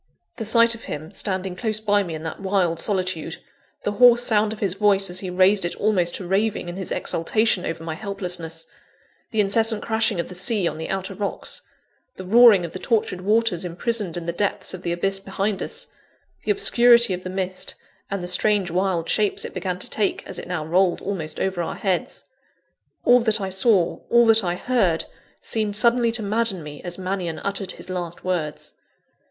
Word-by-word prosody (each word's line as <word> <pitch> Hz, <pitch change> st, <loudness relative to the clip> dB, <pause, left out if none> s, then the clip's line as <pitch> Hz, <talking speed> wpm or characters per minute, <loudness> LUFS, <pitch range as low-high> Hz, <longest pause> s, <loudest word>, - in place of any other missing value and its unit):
_" -, -, -39 dB
The 225 Hz, -, -4 dB
sight 230 Hz, +2 st, +5 dB
of 230 Hz, -, -10 dB
him, 155 Hz, +3 st, -6 dB
standing 190 Hz, -2 st, -2 dB
close 215 Hz, +2 st, 0 dB
by 205 Hz, -1 st, +2 dB
me 170 Hz, -5 st, -4 dB
in 155 Hz, -, -7 dB
that 160 Hz, -, -6 dB
wild 190 Hz, -4 st, 0 dB
solitude; 185 Hz, -4 st, -2 dB, 0.5 s
the 205 Hz, -, 0 dB
hoarse 240 Hz, +2 st, +6 dB
sound 215 Hz, -2 st, +3 dB
of 220 Hz, -, -6 dB
his 195 Hz, -4 st, 0 dB
voice, 195 Hz, -1 st, +2 dB
as 180 Hz, -, +1 dB
he 185 Hz, -, -4 dB
raised 190 Hz, +2 st, +4 dB
it 175 Hz, -, -2 dB
almost 185 Hz, -5 st, +1 dB
to 185 Hz, -, -6 dB
raving 195 Hz, 0 st, 0 dB
in 175 Hz, -, -6 dB
his 190 Hz, -1 st, -5 dB
exultation 205 Hz, +3 st, 0 dB
over 165 Hz, 0 st, -5 dB
my 165 Hz, -1 st, -4 dB
helplessness; 175 Hz, -3 st, -4 dB, 0.6 s
the 220 Hz, -, -2 dB
incessant 220 Hz, +2 st, +3 dB
crashing 220 Hz, -4 st, +1 dB
of 170 Hz, -, -2 dB
the -, -, -9 dB
sea 190 Hz, +1 st, +1 dB
on -, -, -4 dB
the 160 Hz, -, -5 dB
outer 195 Hz, 0 st, -3 dB
rocks; 200 Hz, +1 st, -2 dB, 0.5 s
the 185 Hz, -, -8 dB
roaring 220 Hz, -2 st, +6 dB
of 165 Hz, -, -7 dB
the 185 Hz, -, -7 dB
tortured 210 Hz, -5 st, -1 dB
waters 210 Hz, -2 st, +1 dB
imprisoned 185 Hz, +1 st, -1 dB
in 170 Hz, -, -5 dB
the 170 Hz, -, -2 dB
depths 200 Hz, +2 st, -2 dB
of 185 Hz, -, -7 dB
the 175 Hz, -, -3 dB
abyss 195 Hz, +3 st, 0 dB
behind 195 Hz, +1 st, -2 dB
us; -, -, -5 dB, 0.6 s
the -, -, -4 dB
obscurity 240 Hz, -, +5 dB
of 180 Hz, 0 st, -5 dB
the 185 Hz, -, -5 dB
mist, 185 Hz, 0 st, -3 dB, 0.3 s
and 200 Hz, -2 st, -3 dB
the -, -, -4 dB
strange, 195 Hz, 0 st, +1 dB
wild 180 Hz, -2 st, 0 dB
shapes 210 Hz, -2 st, +1 dB
it -, -, -7 dB
began 180 Hz, -1 st, -3 dB
to 185 Hz, -, -9 dB
take, 210 Hz, -2 st, -1 dB
as -, -, -7 dB
it -, -, -8 dB
now 175 Hz, -4 st, -3 dB
rolled 180 Hz, +2 st, +2 dB
almost 165 Hz, -6 st, -4 dB
over 190 Hz, -2 st, -1 dB
our 170 Hz, -, -4 dB
heads 190 Hz, -3 st, -2 dB, 0.8 s
all 245 Hz, 0 st, +6 dB
that 220 Hz, -2 st, +1 dB
I 190 Hz, -1 st, -4 dB
saw, 190 Hz, -2 st, +2 dB
all 235 Hz, 0 st, +5 dB
that 225 Hz, -1 st, +5 dB
I 175 Hz, -1 st, -1 dB
heard, 190 Hz, -6 st, +1 dB, 0.4 s
seemed 215 Hz, -2 st, -2 dB
suddenly 235 Hz, +2 st, +3 dB
to 230 Hz, -2 st, 0 dB
madden 205 Hz, -3 st, 0 dB
me, 150 Hz, -1 st, -9 dB
as 175 Hz, -1 st, -5 dB
Mannion 185 Hz, -3 st, -3 dB
uttered 200 Hz, -2 st, -3 dB
his -, -, -12 dB
last 175 Hz, -2 st, -5 dB
words. 165 Hz, -5 st, -3 dB
195 Hz, 200 wpm, -23 LUFS, 180-215 Hz, 0.8 s, hoarse